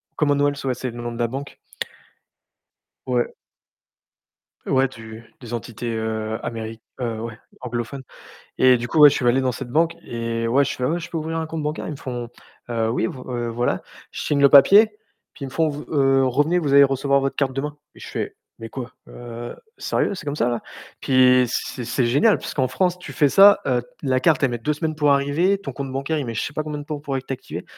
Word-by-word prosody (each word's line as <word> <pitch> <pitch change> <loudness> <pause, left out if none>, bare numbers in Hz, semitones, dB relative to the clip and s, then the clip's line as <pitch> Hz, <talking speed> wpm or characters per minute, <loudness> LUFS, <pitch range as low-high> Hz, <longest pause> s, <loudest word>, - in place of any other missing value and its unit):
Commonwealth. 145 -1 +1
Ouais, 130 -1 0
c'est 130 +1 -4
le 120 +1 -8
nom 120 0 -4
de 120 - -8
la 120 - +2
banque. 135 +4 -7 1.5
Ouais. 125 -1 +1 1.4
Ouais, 135 0 +2
du 110 -2 -11 0.2
des 120 -2 -7
entités, 115 0 -4
heu, 110 0 -2
améri 115 -1 -5 0.2
heu, 115 -3 -2
ouais, 115 -1 -6 0.2
anglophones. 125 +2 -4 0.6
Et 130 -1 +6
du 120 0 -4
coup, 155 +6 +1
ouais, 145 -1 +10
je - - -1
suis 125 - -1
allé 125 +2 +4
dans 130 -1 +1
cette 125 +1 -6
banque 165 +5 +2
et 115 -1 -3
ouais, 135 +5 +3
je 140 - -3
fais: 125 - -3
«Ah - - +2
ouais, 170 +2 -1
je 170 0 -8
peux 165 - -2
ouvrir 160 +1 -3
un 160 - -2
compte 160 -2 -4
bancaire?» 150 +3 -3
ils - - -3
me - - -6
font: 120 -3 -5 0.4
«Heu, 115 -2 0
oui, 115 - 0
v - - -8
heu, 120 -2 -2
voilà». 120 +1 -1 0.3
Je - - -6
signe 145 -1 0
le 140 - +7
papier, 195 +11 +8 0.5
puis 140 - -8
ils - - -4
me - - -11
font: 160 +4 +1
«Vous 145 0 -6
heu, 135 -2 +4
revenez, 145 +7 +2
vous 145 -4 -1
allez 140 0 +9
recevoir 140 0 +2
votre 135 0 -1
carte 135 -2 0
demain» 145 +2 -3 0.2
et - - -13
je - - -10
fais: - - -4 0.2
«Mais 115 - -6
quoi? 125 +1 -7 0.2
Heu, 120 0 -8 0.2
sérieux, - - 0
'est 185 -3 -7
comme 145 0 -3
ça 120 - +1
là?» 120 -2 -1 0.4
puis 125 -1 +5
c'est 125 +2 -3
c'est 120 +1 0
génial, 145 - +4
puisqu'en 130 -3 -2
France, 180 +3 0
tu - - -8
fais 145 -3 +3
ça, 200 +6 +7
heu, 125 -3 +1 0.2
la 130 -1 +2
carte, 145 0 +3
elle 130 - +2
met 120 - -2
2 150 +6 -1
semaines 155 +1 -2
pour 150 -1 +2
arriver, 145 +8 +2
ton 145 -9 -7
compte 135 +1 -5
bancaire, 135 +4 -1
il 135 - -4
met 115 - -4
je 115 - -1
sais - - -4
pas 155 - -2
combien 150 -1 -5
de 145 - -7
temps 150 -1 -5
pour 140 -2 -3
être 135 0 -5
activé. 130 - -6
135 Hz, 235 wpm, -22 LUFS, 120-145 Hz, 1.5 s, ouais